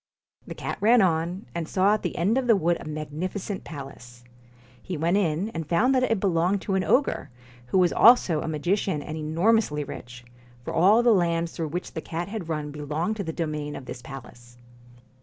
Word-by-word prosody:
The - - -7
cat - - -5
ran 235 +4 +5
on, 175 +2 0
and 170 -2 -4
saw 195 +2 +3
at 215 - 0
the - - -4
end 195 +7 +2
of 255 - -3
the 230 - +6
wood 175 -2 +1
a - - -10
magnificent 155 +6 -5
palace. 125 -5 -10 0.6
He 180 - -5
went 165 +4 +1
in, 180 +1 0
and 165 -7 -6
found 230 +10 +3
that 260 - +3
it 225 -5 +1
belonged 185 +1 +1
to 195 - -2
an 190 -1 +1
ogre, 275 +8 +1 0.4
who 155 - 0
was 180 -2 +4
also 205 -10 +5
a - - -4
magician 160 +1 -1
and 155 - -6
enormously 160 +1 +1
rich, 120 -3 -9 0.4
for - - -5
all 200 +8 +5
the 240 -2 +5
lands 170 -3 +1
through 165 - -4
which 175 +4 -5
the 160 - -4
cat 170 +4 -5
had 200 -6 -6
run 150 -2 -3
belonged 155 +8 -3
to 200 - -2
the 165 - -4
domain 150 -3 -3
of 130 - -8
this 120 - -8
palace. 120 -3 -11
170 Hz, 200 wpm, -25 LUFS, 150-200 Hz, 0.6 s, the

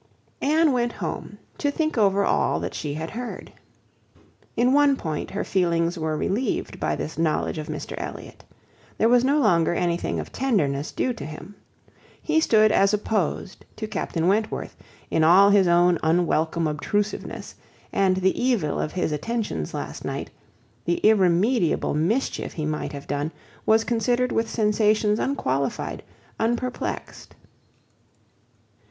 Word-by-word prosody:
Anne 310 +2 +3
went 240 -2 0
home 180 +3 -5 0.2
to 290 - +1
think 310 +2 -1
over 200 -3 +3
all - - +1
that - - -4
she 145 -2 -4
had 160 +1 -5
heard. 245 +2 -7 1.0
In 250 +2 +3
one 290 -1 +5
point, 155 - -4
her 200 - -3
feelings 170 -2 +1
were 160 -2 -2
relieved 215 +11 -2
by - - 0
this 160 - -5
knowledge 160 0 0
of 155 - -6
Mr 155 -2 -5
Elliot. - - -8 0.5
There 225 - +3
was 245 0 +5
no 280 +3 +3
longer 175 - +3
anything 175 -1 -1
of - - -6
tenderness 155 - 0
due 255 - -1
to 230 - -8
him. 155 +7 -9 0.7
He 315 0 +1
stood 215 -8 +4
as 200 0 +4
opposed 205 -3 -2
to 220 - -4
Captain 170 -5 -2
Wentworth, 215 +3 0 0.4
in 160 - +2
all 190 +5 +7
his 200 -2 +5
own 175 0 +4
unwelcome 165 0 +1
obtrusiveness; 200 +8 -2 0.4
and 190 -1 +2
the 190 +5 +1
evil 230 - +1
of - - -3
his 180 -3 -1
attentions 155 - -3
last - - -6
night, - - -4 0.5
the 170 +5 0
irremediable 195 0 +3
mischief 185 - -1
he 155 - -3
might 155 0 -3
have 140 -1 -8
done, 145 +2 -2 0.4
was 220 +1 +5
considered 240 +2 +1
with 225 0 0
sensations 210 -1 +2
unqualified, 140 - -2 0.4
unperplexed. 240 +2 -3
195 Hz, 140 wpm, -24 LUFS, 165-230 Hz, 1.0 s, all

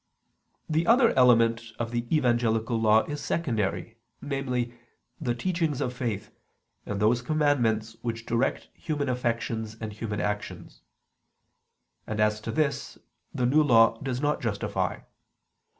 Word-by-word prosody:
The 160 +2 0
other 235 0 +6
element 115 -2 +5 0.2
of 120 0 -3
the 120 0 -2
Evangelical 120 -5 +1
Law 110 0 +5
is 145 -1 -5
secondary: 110 - -2 0.2
namely, 125 -4 -2 0.5
the 120 -6 -1
teachings 165 0 -1
of 125 - -1
faith, 115 -5 -4 0.6
and 100 -1 -3
those 115 +3 +3
commandments 120 -6 +1
which 115 -1 -4
direct 115 +4 -1
human 145 -4 -3
affections 115 -3 -2
and 110 -1 -5
human 105 -1 -4
actions. 105 0 -4 1.3
And 110 -1 -3
as 105 0 +2
to - - -4
this, 150 -2 -1 0.3
the 125 - -1
New 145 +5 +4
Law 115 -5 +5
does 130 -2 -2
not 150 +1 0
justify. 110 -5 -2
120 Hz, 130 wpm, -27 LUFS, 110-140 Hz, 1.3 s, other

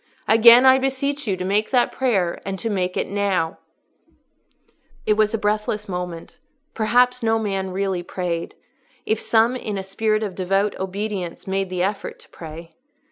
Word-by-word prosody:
Again 235 +3 +8
I 260 0 +7
beseech 270 +1 -2
you 190 -2 0
to 180 - -4
make 205 +3 +1
that 250 -2 +2
prayer, 200 -10 0
and 195 0 -4
to 225 +3 -3
make 185 -2 -1
it - - -1
now." 195 -5 -1 1.5
It 215 - +3
was 215 +1 +2
a - - 0
breathless 210 0 -1
moment: 180 -3 -6 0.3
perhaps 250 +3 +2
no 225 -1 +2
man 195 -3 -2
really 190 -1 -2
prayed, 175 -1 -4 0.5
if 220 0 0
some 230 +2 +2
in 215 -5 -4
a 190 - -4
spirit 215 +3 0
of 200 -3 -4
devout 195 +3 0
obedience 190 -2 -4
made 195 0 -2
the 180 -1 -1
effort 200 +1 -3
to - - -20
pray. 165 +1 -10
200 Hz, 165 wpm, -22 LUFS, 185-225 Hz, 1.5 s, Again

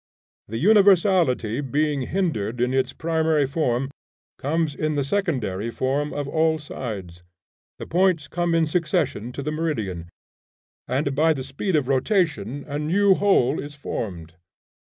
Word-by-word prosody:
The 115 - -4
universality 180 - +4
being 145 +1 0
hindered 125 - -1
in 125 +1 +1
its 130 -1 +1
primary 160 -1 +1
form, 135 -2 -1 0.5
comes 155 +1 0
in 155 +1 -2
the 140 - +1
secondary 130 - -1
form 135 +5 -1
of 145 -1 -3
all 160 +1 +2
sides; 105 - -7 0.6
the - - -7
points 175 -4 +2
come 175 +1 0
in 165 -1 +3
succession 155 - -1
to 140 - -5
the 150 - -2
meridian, 110 - -3 0.8
and 140 +2 0
by 160 +3 +3
the 135 -3 -5
speed 140 +8 -2
of 145 -4 +1
rotation 140 - 0
a 145 0 -3
new 190 +6 +3
whole 185 -9 +2
is 145 +1 -7
formed. 90 - -5
145 Hz, 140 wpm, -23 LUFS, 125-165 Hz, 0.8 s, universality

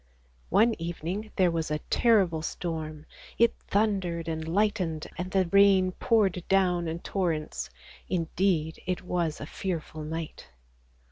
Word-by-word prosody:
One 230 +2 +4
evening 175 +5 -4
there 185 -3 +3
was 165 -1 -2
a 150 - 0
terrible 195 -9 +3
storm; 155 -2 -4 0.3
it 235 0 +4
thundered 190 -6 0
and 160 -1 -3
lightened 180 -4 0
and 180 +1 -4
the 190 -1 +2
rain 195 -2 +5
poured 195 -4 +1
down 180 -3 +3
in 160 +1 -2
torrents; 165 - -2 0.4
indeed 165 -2 0
it 185 +1 -2
was 170 -4 -1
a - - -5
fearful 165 -2 -4
night. 160 +1 -6
175 Hz, 130 wpm, -28 LUFS, 160-195 Hz, 0.4 s, rain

